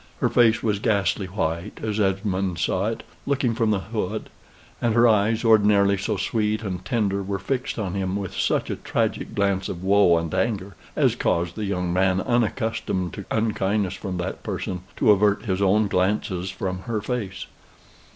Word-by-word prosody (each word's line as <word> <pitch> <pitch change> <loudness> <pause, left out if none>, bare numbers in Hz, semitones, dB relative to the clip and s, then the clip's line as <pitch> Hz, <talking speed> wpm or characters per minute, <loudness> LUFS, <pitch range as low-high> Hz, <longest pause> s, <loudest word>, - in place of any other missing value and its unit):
Her - - +2
face 115 -2 +4
was 105 -3 +1
ghastly 100 -3 +1
white, 85 -3 -3
as 110 -1 -1
Esmond 95 -2 0
saw 95 +5 0
it, 115 - -3 0.2
looking 135 -4 +1
from 115 -1 +1
the 100 -3 +1
hood; 110 -1 -3 0.5
and 115 -2 +1
her 120 0 +6
eyes, 110 +1 +2
ordinarily 105 -2 +5
so 100 +2 -2
sweet 105 +2 0
and 90 -3 -4
tender, 100 -2 0
were 100 0 -3
fixed 125 +7 -3
on 100 -5 -2
him 95 -1 -2
with 100 -2 -4
such - - 0
a - - -3
tragic - - -2
glance 100 -1 0
of 90 0 -6
woe 95 -3 +5
and 85 0 -3
anger, 95 -1 -1 0.2
as - - +3
caused 85 0 0
the 110 - -3
young 90 -3 -1
man, 95 0 +2
unaccustomed 110 - -1
to - - -7
unkindness 105 -3 0
from 95 -3 -5
that 90 +1 -4
person, 90 -1 -4 0.2
to - - +5
avert 105 +1 +3
his 95 -2 -1
own 100 +2 +3
glances 95 -1 0
from 95 0 -3
her 110 -2 0
face. 105 -3 -4
100 Hz, 175 wpm, -24 LUFS, 95-110 Hz, 0.5 s, her